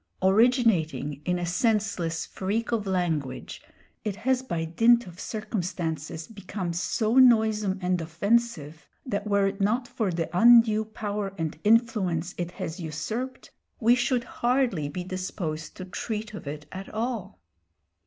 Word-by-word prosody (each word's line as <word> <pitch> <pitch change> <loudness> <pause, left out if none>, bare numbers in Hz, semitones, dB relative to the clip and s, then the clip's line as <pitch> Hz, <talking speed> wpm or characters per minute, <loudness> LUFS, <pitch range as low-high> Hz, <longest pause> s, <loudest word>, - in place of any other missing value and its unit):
Originating 190 - +3
in 180 0 +1
a 175 - -2
senseless 185 -4 0
freak 215 +5 -2
of 215 -4 -1
language, 165 -8 -2 0.4
it 210 -3 -2
has 255 +4 +1
by 170 -11 -3
dint 230 +8 +4
of 180 -1 -12
circumstances 175 -7 -4
become 195 -4 -5
so 215 +7 0
noisome 220 -5 +4
and 180 -1 +1
offensive, 165 -3 -1 0.2
that 205 -4 -2
were 200 -1 +3
it 195 +1 -2
not 235 +5 +1
for 220 -5 -1
the 165 -2 -1
undue 225 +1 +6
power 205 -2 -4
and 160 -2 -3
influence 205 -7 +2
it 175 -1 -2
has 165 -1 -6
usurped, 215 +11 -5 0.3
we 235 +1 +5
should 250 0 +1
hardly 240 - 0
be 180 +5 -4
disposed 180 -4 -5
to 185 - -6
treat 215 +3 -4
of 205 - -8
it 150 +1 -6
at 190 +1 -7
all. 220 -3 -3
200 Hz, 140 wpm, -27 LUFS, 170-225 Hz, 0.4 s, undue